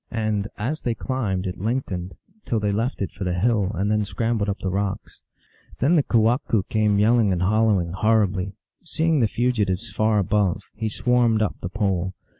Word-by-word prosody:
And, 110 Hz, -2 st, -1 dB
as 135 Hz, +9 st, -3 dB
they 120 Hz, -2 st, -1 dB
climbed, 105 Hz, -9 st, -2 dB
it 90 Hz, -2 st, -4 dB
lengthened, 95 Hz, -6 st, -3 dB, 0.3 s
till 115 Hz, -, +1 dB
they 105 Hz, -1 st, 0 dB
left 115 Hz, +2 st, -1 dB
it -, -, -4 dB
for 100 Hz, -, -7 dB
the 90 Hz, -1 st, -1 dB
hill, 105 Hz, 0 st, +1 dB
and 100 Hz, +4 st, 0 dB
then 105 Hz, 0 st, +2 dB
scrambled 105 Hz, +2 st, -1 dB
up 100 Hz, -, -1 dB
the 95 Hz, -, -3 dB
rocks. 100 Hz, 0 st, -3 dB, 0.6 s
Then 150 Hz, +8 st, +3 dB
the 155 Hz, -, +5 dB
kewahqu 115 Hz, -3 st, +2 dB
came 105 Hz, -2 st, +2 dB
yelling 110 Hz, 0 st, +4 dB
and 90 Hz, -1 st, 0 dB
howling 105 Hz, -4 st, +2 dB
horri 105 Hz, +1 st, +2 dB
bly. 95 Hz, 0 st, -4 dB, 0.3 s
Seeing 165 Hz, -2 st, +1 dB
the 115 Hz, -, +3 dB
fugitives 115 Hz, -3 st, -1 dB
far 110 Hz, 0 st, +1 dB
above, 100 Hz, -1 st, +1 dB
he 110 Hz, 0 st, -3 dB
swarmed 120 Hz, -1 st, +2 dB
up 105 Hz, -, -2 dB
the 90 Hz, -, -4 dB
pole. 95 Hz, -3 st, -1 dB
105 Hz, 185 wpm, -23 LUFS, 95-115 Hz, 0.6 s, the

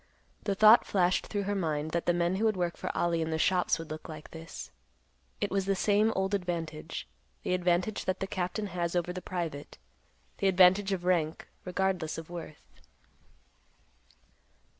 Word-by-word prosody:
The 200 Hz, -, 0 dB
thought 215 Hz, +3 st, +8 dB
flashed 185 Hz, -2 st, +2 dB
through 205 Hz, -1 st, -2 dB
her 200 Hz, +1 st, -1 dB
mind 160 Hz, -5 st, -1 dB
that 170 Hz, 0 st, -2 dB
the -, -, +6 dB
men 175 Hz, +2 st, +1 dB
who 220 Hz, -, +1 dB
would 215 Hz, -3 st, +2 dB
work 175 Hz, -1 st, -1 dB
for -, -, -5 dB
Ollie 170 Hz, -1 st, +1 dB
in 160 Hz, -, -1 dB
the 160 Hz, -, 0 dB
shops 180 Hz, +2 st, +2 dB
would 165 Hz, -2 st, -8 dB
look 155 Hz, +1 st, -7 dB
like 155 Hz, -1 st, -9 dB
this. 165 Hz, 0 st, -9 dB, 0.7 s
It -, -, -1 dB
was 195 Hz, 0 st, 0 dB
the 195 Hz, -, +2 dB
same 210 Hz, +3 st, +3 dB
old 190 Hz, +1 st, 0 dB
advantage; 165 Hz, -4 st, -3 dB, 0.4 s
the -, -, 0 dB
advantage 180 Hz, +3 st, +1 dB
that 185 Hz, 0 st, -1 dB
the 195 Hz, -, -1 dB
captain 190 Hz, +2 st, -2 dB
has 170 Hz, -1 st, -1 dB
over 175 Hz, 0 st, 0 dB
the 185 Hz, -, -5 dB
private; 165 Hz, -6 st, -5 dB, 0.6 s
the 195 Hz, -, +2 dB
advantage 190 Hz, +2 st, +5 dB
of 180 Hz, -2 st, -2 dB
rank, 165 Hz, -3 st, 0 dB, 0.2 s
regardless 180 Hz, -3 st, -1 dB
of 165 Hz, +1 st, -8 dB
worth. 165 Hz, -3 st, -8 dB
180 Hz, 175 wpm, -30 LUFS, 165-195 Hz, 0.7 s, thought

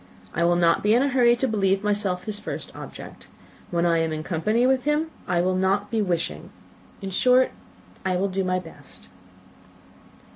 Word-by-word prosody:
I 170 Hz, -, 0 dB
will 175 Hz, 0 st, +3 dB
not 170 Hz, -1 st, +3 dB
be 210 Hz, +2 st, +3 dB
in 250 Hz, -, +4 dB
a 280 Hz, -, +1 dB
hurry 245 Hz, -2 st, +4 dB
to 265 Hz, +2 st, -1 dB
believe 195 Hz, -3 st, +1 dB
myself 205 Hz, -3 st, 0 dB
his 210 Hz, -2 st, -3 dB
first 210 Hz, -, -6 dB
object. -, -, -10 dB, 0.4 s
When 170 Hz, 0 st, 0 dB
I 165 Hz, -1 st, +3 dB
am 165 Hz, -1 st, 0 dB
in 155 Hz, 0 st, -3 dB
company 210 Hz, +9 st, +1 dB
with 260 Hz, -1 st, +2 dB
him, 300 Hz, +2 st, +1 dB, 0.2 s
I 175 Hz, -1 st, +2 dB
will 185 Hz, +1 st, +1 dB
not 190 Hz, +3 st, 0 dB
be 225 Hz, -2 st, +1 dB
wishing. 175 Hz, -4 st, -2 dB, 0.5 s
In 195 Hz, -, -4 dB
short, 255 Hz, +6 st, +4 dB, 0.5 s
I 185 Hz, -1 st, 0 dB
will 190 Hz, +2 st, +1 dB
do 195 Hz, 0 st, -1 dB
my 185 Hz, 0 st, 0 dB
best." 170 Hz, -3 st, -8 dB
195 Hz, 185 wpm, -24 LUFS, 180-230 Hz, 0.5 s, in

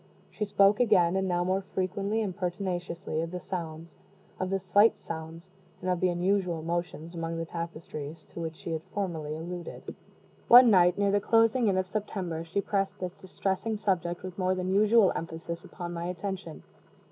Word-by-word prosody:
She 210 Hz, -, -2 dB
spoke 200 Hz, 0 st, +4 dB
again, 190 Hz, -7 st, +4 dB
and 190 Hz, 0 st, +1 dB
now 175 Hz, -1 st, +1 dB
more 185 Hz, +2 st, +1 dB
frequently 195 Hz, +3 st, -1 dB
and 190 Hz, -4 st, -3 dB
pertinaciously, 180 Hz, -3 st, -3 dB
of 165 Hz, -, -3 dB
the 180 Hz, +1 st, -5 dB
sounds 165 Hz, -3 st, -6 dB, 0.4 s
of 185 Hz, -, -1 dB
the 195 Hz, -, +1 dB
slight 200 Hz, +4 st, +4 dB
sounds 165 Hz, +2 st, -8 dB, 0.3 s
and 185 Hz, -, -1 dB
of 180 Hz, -, 0 dB
the 185 Hz, -, +3 dB
unusual 175 Hz, -2 st, 0 dB
motions 170 Hz, 0 st, -3 dB
among 165 Hz, -1 st, -3 dB
the 165 Hz, -, -2 dB
tapestries, 165 Hz, -2 st, -6 dB
to -, -, -7 dB
which 165 Hz, -1 st, -4 dB
she 165 Hz, -, -7 dB
had 160 Hz, -1 st, -2 dB
formerly 160 Hz, -7 st, -2 dB
alluded. 175 Hz, +2 st, -7 dB, 0.5 s
One 245 Hz, -1 st, +9 dB
night, 180 Hz, -2 st, +5 dB
near 200 Hz, -1 st, +2 dB
the 205 Hz, 0 st, +2 dB
closing 225 Hz, +2 st, +3 dB
in 190 Hz, -2 st, +2 dB
of 185 Hz, -, +1 dB
September, 185 Hz, -5 st, -3 dB
she 170 Hz, +4 st, -1 dB
pressed 195 Hz, -1 st, -1 dB
this 180 Hz, 0 st, -4 dB
distressing 195 Hz, +3 st, -2 dB
subject 180 Hz, -4 st, -1 dB
with 185 Hz, 0 st, -7 dB
more 185 Hz, 0 st, +2 dB
than 185 Hz, 0 st, -1 dB
usual 210 Hz, 0 st, +5 dB
emphasis 165 Hz, +1 st, -5 dB
upon 175 Hz, -1 st, -7 dB
my 170 Hz, 0 st, -4 dB
attention. 180 Hz, -1 st, -5 dB
180 Hz, 180 wpm, -29 LUFS, 170-195 Hz, 0.5 s, One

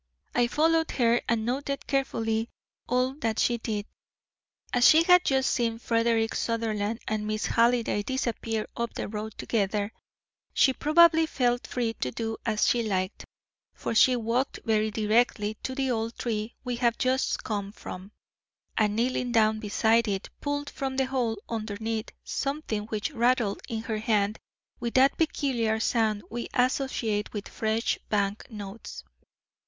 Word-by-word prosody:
I 245 Hz, -1 st, +3 dB
followed 320 Hz, +4 st, +2 dB
her 240 Hz, -1 st, +3 dB
and 225 Hz, -1 st, +1 dB
noted 275 Hz, +3 st, -2 dB
carefully 225 Hz, -5 st, 0 dB, 0.4 s
all 250 Hz, +2 st, +2 dB
that 225 Hz, -4 st, -1 dB
she 240 Hz, -1 st, +2 dB
did. 210 Hz, -3 st, -3 dB, 0.9 s
As 245 Hz, 0 st, +6 dB
she 320 Hz, +1 st, +7 dB
had 360 Hz, 0 st, +6 dB
just 265 Hz, -1 st, +2 dB
seen 230 Hz, -2 st, 0 dB
Frederick 230 Hz, -1 st, +1 dB
Sutherland 225 Hz, -1 st, -1 dB
and 210 Hz, 0 st, -1 dB
Miss 215 Hz, 0 st, -1 dB
Halliday 235 Hz, -2 st, +2 dB
disappear 225 Hz, -2 st, -2 dB
up 235 Hz, -1 st, -3 dB
the -, -, -3 dB
road 215 Hz, 0 st, -6 dB
together, 205 Hz, -1 st, -1 dB, 0.6 s
she 265 Hz, -, +5 dB
probably 320 Hz, +2 st, +5 dB
felt 245 Hz, -5 st, 0 dB
free 235 Hz, -2 st, -1 dB
to 125 Hz, -, -1 dB
do 225 Hz, -, -4 dB
as 215 Hz, -2 st, +2 dB
she 240 Hz, -, +3 dB
liked, 190 Hz, -3 st, -2 dB, 0.5 s
for -, -, -3 dB
she 250 Hz, +3 st, +6 dB
walked 240 Hz, +3 st, -1 dB
very 220 Hz, -1 st, +2 dB
directly 215 Hz, 0 st, +1 dB
to 260 Hz, -, -4 dB
the 265 Hz, -1 st, 0 dB
old 225 Hz, 0 st, -2 dB
tree 220 Hz, -1 st, -3 dB
we 250 Hz, -2 st, -3 dB
have 235 Hz, -1 st, +2 dB
just 260 Hz, +1 st, 0 dB
come 200 Hz, -2 st, -3 dB
from, 190 Hz, -2 st, -9 dB, 0.6 s
and 210 Hz, -1 st, +2 dB
kneeling 245 Hz, +1 st, 0 dB
down 220 Hz, -2 st, +3 dB
beside 220 Hz, +2 st, +2 dB
it 195 Hz, -1 st, -3 dB
pulled 285 Hz, 0 st, -2 dB
from 270 Hz, -1 st, -4 dB
the 265 Hz, -, +3 dB
hole 250 Hz, -4 st, -1 dB
underneath 220 Hz, 0 st, -3 dB
something 275 Hz, -7 st, -3 dB
which 215 Hz, +6 st, -2 dB
rattled 240 Hz, -5 st, +1 dB
in 225 Hz, -1 st, -3 dB
her 220 Hz, -2 st, -2 dB
hand 215 Hz, -1 st, +1 dB, 0.4 s
with 235 Hz, -1 st, -4 dB
that 265 Hz, +1 st, +5 dB
peculiar 245 Hz, -8 st, 0 dB
sound 220 Hz, -2 st, +1 dB
we 240 Hz, +1 st, -4 dB
associate 250 Hz, -5 st, 0 dB
with 205 Hz, -2 st, -5 dB
fresh 220 Hz, +1 st, -1 dB
bank 200 Hz, 0 st, -1 dB
notes. 210 Hz, -1 st, -8 dB
230 Hz, 150 wpm, -27 LUFS, 215-255 Hz, 0.9 s, she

